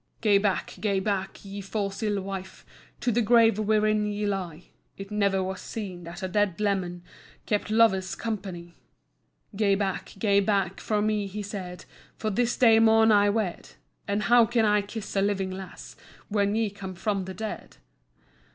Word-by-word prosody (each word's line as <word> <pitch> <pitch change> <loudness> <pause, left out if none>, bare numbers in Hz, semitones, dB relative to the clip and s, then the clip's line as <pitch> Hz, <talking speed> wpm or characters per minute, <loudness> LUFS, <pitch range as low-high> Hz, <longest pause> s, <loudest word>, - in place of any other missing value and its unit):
"Gae 205 -3 +4
back, 200 -2 -1
gae 200 -3 +1
back, 195 0 -3
ye 200 +1 -6
fause 195 +1 -3
ill 210 -2 0
wife, 190 -1 -7 0.4
To 245 - +1
the 235 +2 +2
grave 225 -1 +4
wherein 215 0 +2
ye 210 0 -2
lie, 180 -5 -4 0.3
It 195 +1 -8
never 200 -2 +1
was 190 0 -4
seen 185 -6 -6
that 170 +2 -8
a - - 0
dead 200 -1 0
leman 185 -4 -1 0.4
Kept 210 -1 -1
lover's 215 -4 +3
company! 185 -6 -5 0.8
"Gae 200 -1 +3
back, 195 -2 -3
gae 200 -1 +3
back 195 -2 0
frae 210 -1 0
me," 210 -1 0
he 205 +2 -5
said, 190 -3 -7 0.3
"For 215 - -2
this 240 +3 0
day 225 -3 +6
maun 225 0 +5
I 205 -1 +5
wed, 205 -4 -2 0.3
And 205 +1 0
how 240 -1 +5
can 230 -1 +2
I 210 0 +3
kiss 205 +1 -7
a 195 - +3
living 195 -1 0
lass, 190 0 -9 0.3
When 205 -1 +1
ye 220 -2 0
come 190 -2 -8
frae 200 +2 -1
the 190 0 -7
dead? 220 +3 -6
205 Hz, 170 wpm, -27 LUFS, 190-215 Hz, 0.8 s, day